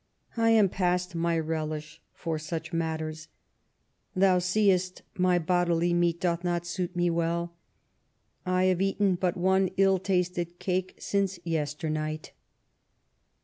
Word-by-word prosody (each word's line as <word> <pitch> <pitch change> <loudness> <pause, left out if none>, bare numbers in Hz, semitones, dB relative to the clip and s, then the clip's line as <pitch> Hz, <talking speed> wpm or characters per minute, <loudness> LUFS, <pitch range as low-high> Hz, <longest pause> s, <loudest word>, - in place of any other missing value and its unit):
I 225 -1 +3
am 220 -3 +6
past 180 0 0
my 170 0 0
relish 155 -1 -3
for 165 -2 -4
such 160 +2 -5
matters. 160 -1 -3 0.9
Thou 185 -1 +4
seest 185 -1 +1
my 180 -1 +3
bodily 175 0 +1
meat 170 -1 +2
doth 175 -1 0
not 175 -1 -1
suit 175 +1 -3
me 175 0 +2
well; 170 +1 -1 0.9
I 185 0 +1
have 185 -1 +2
eaten 195 0 +2
but 180 +1 -1
one 190 +1 +3
ill 195 -1 +4
tasted 180 -2 -1
cake 185 0 -2
since 195 -2 -1
yesternight.' 155 -1 -3
175 Hz, 125 wpm, -28 LUFS, 165-185 Hz, 0.9 s, am